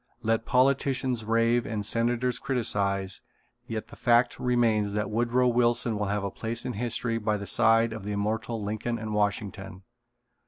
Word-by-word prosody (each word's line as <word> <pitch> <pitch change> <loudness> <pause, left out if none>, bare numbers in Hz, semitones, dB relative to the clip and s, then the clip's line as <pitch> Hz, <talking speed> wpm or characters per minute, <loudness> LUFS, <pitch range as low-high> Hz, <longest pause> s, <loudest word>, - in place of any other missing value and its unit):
Let 115 0 0
politicians 130 -2 +1
rave 115 +1 +2
and 105 -2 -3
senators 120 +2 +1
criticize, 100 -7 0 0.5
yet 110 -1 -5
the - - -11
fact 120 +1 +2
remains 115 -5 +1
that 105 0 -2
Woodrow 120 +3 +2
Wilson 120 -1 +2
will 105 - -1
have 100 0 -1
a 100 - -3
place 115 +4 -4
in 125 - -3
history 115 +1 -1
by 105 -1 0
the 100 - -6
side 115 +1 +3
of 110 -3 -7
the 105 +1 -4
immortal 110 +2 -2
Lincoln 110 +3 -3
and 110 -1 -5
Washington. 100 -2 -2
115 Hz, 160 wpm, -27 LUFS, 105-120 Hz, 0.5 s, side